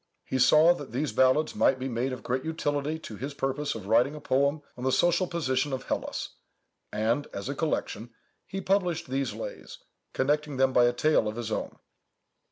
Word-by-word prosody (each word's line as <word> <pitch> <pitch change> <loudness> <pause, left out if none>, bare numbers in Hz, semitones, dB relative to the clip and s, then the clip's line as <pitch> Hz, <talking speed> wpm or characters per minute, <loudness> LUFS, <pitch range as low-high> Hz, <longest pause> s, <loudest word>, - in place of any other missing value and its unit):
He 130 - -2
saw 155 +6 +6
that 145 -8 -9
these 140 +4 -1
ballads 130 +4 +3
might 135 - +3
be 130 +1 -4
made 125 +1 -1
of 130 - -6
great 130 +1 -1
utility 150 -1 -1
to 110 -9 -9
his 140 +3 -5
purpose 135 +1 -2
of 110 -4 -7
writing 120 +8 +3
a - - -7
poem 140 +1 +1
on 125 - -8
the 130 - +2
social 175 +5 +3
position 140 -4 -1
of 130 0 -3
Hellas, - - -3 0.6
and, 115 +7 0
as 100 +3 -5
a - - -1
collection, 135 -7 -2 0.4
he 195 - -4
published 180 -8 0
these 135 +1 -1
lays, - - -7 0.4
connecting 145 +1 0
them 130 0 +3
by 125 -1 +6
a 120 - +4
tale 150 -3 +2
of 105 - -3
his 115 -2 -4
own. - - -3
135 Hz, 190 wpm, -28 LUFS, 130-155 Hz, 0.6 s, saw